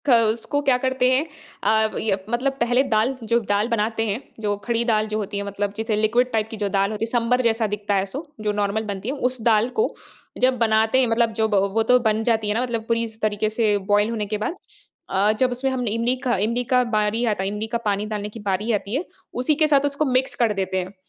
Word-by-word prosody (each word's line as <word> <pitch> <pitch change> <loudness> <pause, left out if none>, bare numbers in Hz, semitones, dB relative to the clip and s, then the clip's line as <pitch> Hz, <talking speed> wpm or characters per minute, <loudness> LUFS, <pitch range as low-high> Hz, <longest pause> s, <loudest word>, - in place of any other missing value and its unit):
ख - - +4 0.2
उसको 235 +6 -2
क्या 255 -2 +5
करते 260 -1 +2
हैं 265 +4 +2 0.4
अ, 220 0 +2
ये 205 -3 +1
मतलब 250 +4 0
पहले 245 +2 +3
दाल 220 +5 +2 0.2
जो 235 - +5
दाल 205 +2 +2
बनाते 225 0 0
हैं 205 +2 -1 0.2
जो 205 -1 0
खड़ी 235 -1 0
दाल 215 -2 +2
जो 215 0 -2
होती 205 -1 -4
है 200 - -2
मतलब 200 0 -3
जैसे 220 0 -1
लिक्विड 235 +4 +2
टाइप 220 -1 0
की 220 - -6
जो 205 -1 -1
दाल 195 +1 +2
होती 220 +1 -2
है 230 - -8
सांभर 245 +1 +2
जैसा 225 -1 +2
दिखता 205 0 -2
है 195 0 +1
सो 300 +4 -5 0.2
जो - - +3
नॉर्मल 205 +2 0
बनती 200 +4 -6
है 275 - -2
उस 255 -2 -4
दाल 220 +1 +3
को 445 - +1 0.5
जब 255 0 +3
बनाते 220 +1 +3
हैं 255 - +3
मतलब 230 0 +1
जब 220 -1 0 0.2
वो 225 - +3
तो 250 +2 +4
बन 220 -2 +1
जाती 225 -2 +1
है - - +2
ना 230 - 0
मतलब 235 -3 -2
पूरी 230 0 0
स 220 0 -13
तरीके 215 0 0
से 215 -2 +1
बॉयल 205 +1 +3
होने 220 -3 -2
के 210 +1 -2
बाद। 215 - -3 0.5
अ, 195 +2 +3
जब 255 -1 +2
उसमें 260 +2 -1
हम 250 -2 -2
इमली 230 +4 0
का 245 -3 +1
इमली 235 +3 -1
का 250 0 +5
बारी 215 +3 +1
आता 190 - -3
है 195 - -1
इमली 210 +2 -4
का 235 +1 -1
पानी 205 0 0
डालने 210 0 -3
की 225 - -10
बारी 205 +2 -1
आती 205 +2 -2
है, 295 - 0 0.3
उसी 255 +5 +1
के 310 +1 +3
साथ 285 -2 +3
उसको 285 +2 0
मिक्स 255 +1 +1
कर 230 -3 +2
देते 190 -1 -2
हैं। 185 +2 -6
225 Hz, 250 wpm, -23 LUFS, 210-245 Hz, 0.5 s, क्या